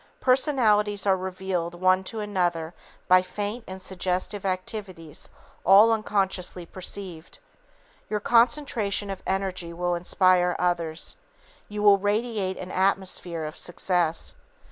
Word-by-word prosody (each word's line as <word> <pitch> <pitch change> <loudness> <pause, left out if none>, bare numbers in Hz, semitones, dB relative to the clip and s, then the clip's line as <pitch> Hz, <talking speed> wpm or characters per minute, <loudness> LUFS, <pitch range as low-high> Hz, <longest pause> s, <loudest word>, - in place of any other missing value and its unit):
Personalities 220 -7 +2
are 195 -1 +4
revealed 185 -2 -3
one 185 +1 +3
to 220 +3 -5
another 175 -5 -1 0.3
by 185 0 +7
faint 205 +5 -4
and 190 0 -7
suggestive 185 +2 -2
activities 185 -4 -5 0.3
all 205 +4 +7
unconsciously 190 -4 -1
perceived. 180 -2 -4 0.7
Your 210 - 0
concentration 230 -4 +2
of 195 - -6
energy 190 -3 -2
will 175 +1 -1
inspire 180 0 +3
others. 170 -2 -1 0.5
You 210 0 -4
will 200 -1 +7
radiate 205 -2 -1
an 185 0 -7
"atmosphere" 185 -3 0
of 155 - -6
success. 175 -2 0
190 Hz, 115 wpm, -26 LUFS, 180-205 Hz, 0.7 s, by